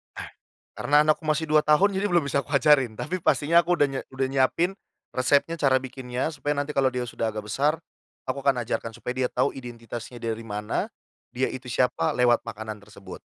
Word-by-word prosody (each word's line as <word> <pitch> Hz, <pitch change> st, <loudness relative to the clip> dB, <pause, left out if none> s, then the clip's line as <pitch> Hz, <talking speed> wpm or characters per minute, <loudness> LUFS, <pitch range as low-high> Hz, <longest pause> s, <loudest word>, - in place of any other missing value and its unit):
Ah, -, -, -7 dB, 0.5 s
karena 145 Hz, +1 st, +4 dB
anakku 155 Hz, +1 st, +1 dB
masih 155 Hz, +1 st, +1 dB
2 155 Hz, 0 st, +4 dB
tahun, 190 Hz, +6 st, +4 dB
jadi 200 Hz, +2 st, +1 dB
belum 175 Hz, -3 st, +3 dB
bisa 140 Hz, 0 st, 0 dB
aku 145 Hz, -, -12 dB
ajarin. 135 Hz, -4 st, +4 dB
Tapi, 180 Hz, +11 st, -3 dB
pastinya 165 Hz, +3 st, +3 dB
aku 175 Hz, +1 st, +1 dB
udah 145 Hz, -, +5 dB
nye 135 Hz, -, -3 dB
udah 130 Hz, 0 st, 0 dB
nyiapin 135 Hz, +7 st, +2 dB, 0.4 s
resepnya, 145 Hz, +6 st, +2 dB
cara 130 Hz, -2 st, +3 dB
bikinnya, 130 Hz, +2 st, -4 dB
supaya 145 Hz, 0 st, -2 dB
nanti 145 Hz, +1 st, -2 dB
kalau 135 Hz, -2 st, +3 dB
dia 125 Hz, 0 st, -2 dB
sudah 115 Hz, -1 st, -3 dB
agak 105 Hz, -1 st, -5 dB
besar, 150 Hz, +8 st, +1 dB, 0.5 s
aku 130 Hz, -, -1 dB
akan 130 Hz, -3 st, +2 dB
ajarkan. 115 Hz, 0 st, -3 dB
Supaya 125 Hz, -, -5 dB
dia -, -, -4 dB
tahu 130 Hz, +3 st, +1 dB
identitasnya 120 Hz, -1 st, -8 dB
dari 115 Hz, 0 st, -3 dB
mana, 105 Hz, 0 st, -2 dB, 0.5 s
dia 130 Hz, +1 st, 0 dB
itu 130 Hz, 0 st, -8 dB
siapa, 125 Hz, -9 st, +1 dB
lewat 120 Hz, -1 st, +3 dB
makanan 110 Hz, -1 st, -6 dB
tersebut, 100 Hz, -2 st, -12 dB
130 Hz, 195 wpm, -25 LUFS, 120-150 Hz, 0.5 s, udah